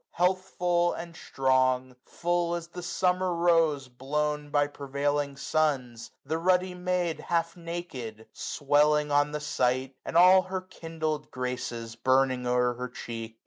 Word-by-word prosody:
Healthful 180 -1 +1
and 170 -1 -7
strong; 130 -2 +1
full 175 0 0
as 170 0 -6
the 180 +1 -7
summer 180 +1 0
rose 165 -5 +2
Blown 150 +4 -2
by 145 0 +3
prevailing 140 0 -2
suns, 135 -6 -1 0.2
the 160 +4 -1
ruddy 180 +1 +2
maid, 180 -2 -1
355 - - -12
Half 165 -1 0
naked, 165 -11 -7
swelling 150 +1 +2
on 145 +1 +3
the 150 - -3
sight, 130 -2 0
and - - -1
all 185 +2 +8
Her 185 0 -4
kindled 160 -4 -4
graces 125 -2 -4
burning 130 +1 +2
o'er 125 0 +2
her 125 +1 -5
cheek. 115 -2 -7
150 Hz, 140 wpm, -28 LUFS, 130-175 Hz, 0.2 s, all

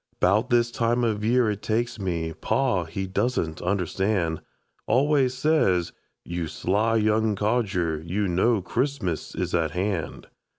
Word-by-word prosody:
'Bout 105 +7 +2
this 120 -1 +3
time 120 +1 +1
of 105 -3 0
year 120 +1 +3
it 105 0 -5
takes 115 +1 -1
me 85 -4 -2
Pa, 100 - 0
he 95 +4 -4
doesn't 95 -4 -1
understand, 90 -2 0 0.5
Always 135 -1 +2
says: 125 - +2 0.3
"You 85 -1 -3
sly 110 +8 0
young 110 0 +2
codger, 100 -7 0
You 95 +5 -1
know 95 +4 +2
Christmas 115 - -2
is - - -3
at 80 -2 +1
hand." 90 -5 -2
105 Hz, 135 wpm, -25 LUFS, 90-120 Hz, 0.5 s, this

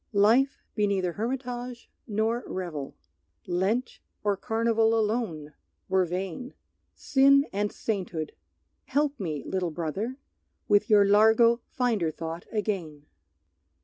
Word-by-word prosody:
Life 230 +7 +3
be 210 -1 +1
neither 190 -3 0
hermitage 245 +2 -4 0.2
nor 220 +3 0
revel; 165 -7 -5 0.5
Lent 200 +8 -1 0.2
or 205 -1 +2
carnival 225 +1 +1
alone 210 -9 -2 0.4
were 190 -1 +3
vain; 185 +8 -5 0.4
Sin 275 +1 +4
and 205 +1 0
sainthood 180 -7 -3 0.5
Help 290 0 0
me, 155 -7 -3
little 185 -2 -1
brother, 175 - -3 0.5
With 205 +3 +3
your 205 -2 +6
largo 220 +3 +5
finder 225 -10 0
thought 165 +2 -6
again! 185 -9 -3
210 Hz, 110 wpm, -27 LUFS, 180-235 Hz, 0.5 s, your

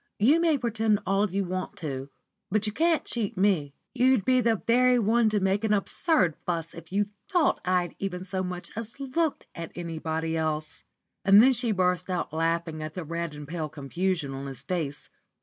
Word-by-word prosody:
You 275 +11 +5
may 330 -3 +3
pretend 225 -3 +1
all 195 +2 +2
you 195 +2 -1
want 185 +1 -4
to, 135 -4 -5 0.4
but 215 +2 +1
you 210 - -1
can't 330 +3 +2
cheat 215 -5 -2
me. 175 -8 +1 0.2
You'd 255 -4 +3
be 255 -1 +4
the 230 -1 +3
very 250 +1 +4
one 225 0 +3
to 210 -1 +1
make 195 +2 +1
an 215 -1 +3
absurd 200 - +1
fuss 165 -2 -3
if 165 +1 -12
you 205 +1 +1 0.2
thought 345 -6 +2
I 180 0 +2
had 175 - -9
even 185 -2 -3
so 190 0 -3
much 180 -1 -4
as 230 +4 -7
looked 285 +3 -1
at 165 -1 -7
anybody 160 -1 -3
else." 155 -1 -2 0.4
And 195 +1 +8
then 260 +4 +7
she 240 -1 0
burst 180 -2 +1
out 180 -4 -2
laughing 165 0 -1
at 155 0 -6
the 180 - -4
red 170 0 -4
and 145 -1 -8
pale 160 -1 -3
confusion 155 +1 -2
of 135 +1 -5
his 135 -1 -5
face. 150 -3 -3
185 Hz, 195 wpm, -27 LUFS, 165-225 Hz, 0.4 s, And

